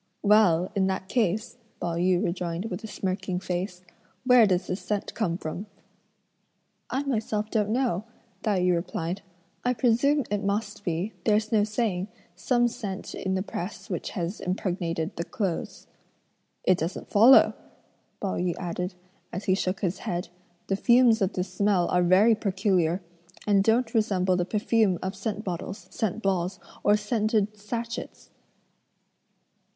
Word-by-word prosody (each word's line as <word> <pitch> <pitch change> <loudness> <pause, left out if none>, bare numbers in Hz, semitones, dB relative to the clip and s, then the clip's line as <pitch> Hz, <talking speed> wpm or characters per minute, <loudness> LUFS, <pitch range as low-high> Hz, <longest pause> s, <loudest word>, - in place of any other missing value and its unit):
"Well, 200 -4 +4
in 195 -2 +2
that 190 0 -2
case," 220 0 0 0.2
Pao 170 -1 -2
yü 180 +1 +2
rejoined 175 +3 -3
with 180 +5 -5
a - - -5
smirking 185 -2 -2
face, 180 0 -4 0.4
"where 250 -3 +7
does 185 -1 +1
this 180 +2 -3
scent 205 -1 -3
come 175 -7 -1
from?" 180 +5 -5 1.2
"I 270 +2 -1
myself 220 -5 -1
don't 210 -2 +1
know," 225 -5 0 0.4
Tai 205 -5 +1
yü 180 0 +3
replied; 170 +2 -2 0.4
"I 250 0 +1
presume 255 +5 +3
it 205 0 0
must 205 +1 -2
be, 175 +5 -2
there's 215 0 +2
no 215 -2 +4
saying, 210 -3 -1 0.3
some 240 +6 +2
scent 210 -5 -5
in 190 0 -2
the 190 - 0
press 195 +1 -6
which 175 - -3
has 175 +3 -3
impregnated 175 -2 -2
the 170 - -1
clothes." 185 -1 -3 0.8
"It 185 -1 +3
doesn't 165 +4 -4
follow," 230 +6 +7 0.7
Pao 195 - -2
yü 175 -1 0
added, 180 +1 -4 0.4
as 185 +3 -4
he 185 - +2
shook 190 0 -1
his 185 -1 -1
head; 175 0 -3 0.4
"the 195 - 0
fumes 235 0 +5
of 195 0 +1
this 185 0 -3
smell 195 -3 +2
are 180 - +3
very 185 +6 +5
peculiar, 190 -4 +1 0.4
and 200 -2 +4
don't 225 +2 +2
resemble 190 -4 +2
the 180 -1 0
perfume 210 -1 +2
of 190 0 -3
scent 210 +1 -3
bottles, 185 +1 -5
scent 220 0 -2
balls, 190 -1 0 0.2
or 205 0 +5
scented 215 -1 0
satchets!" 230 +3 -6
195 Hz, 150 wpm, -27 LUFS, 180-220 Hz, 1.2 s, where